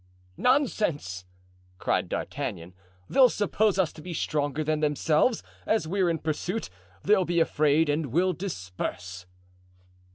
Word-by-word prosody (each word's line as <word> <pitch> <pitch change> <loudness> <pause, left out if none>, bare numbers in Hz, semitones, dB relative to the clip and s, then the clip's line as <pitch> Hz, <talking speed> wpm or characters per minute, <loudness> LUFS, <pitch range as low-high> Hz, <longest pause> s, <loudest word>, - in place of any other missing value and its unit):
"Nonsense!" 175 - +1 0.5
cried - - 0
D'Artagnan, 85 +2 -4 0.3
"they'll 260 -2 +6
suppose 210 -1 +1
us 190 -4 +1
to 155 - -11
be 175 +1 -6
stronger 145 0 -1
than 155 0 0
themselves, 155 - +2 0.2
as 220 -7 +1
we're 185 +1 +1
in 165 - 0
pursuit; 160 - -3 0.3
they'll 205 -1 +4
be 175 -1 0
afraid 155 -1 +3
and 150 +1 0
will 175 +8 +2
disperse." 90 - -5
160 Hz, 125 wpm, -27 LUFS, 145-190 Hz, 0.5 s, they'll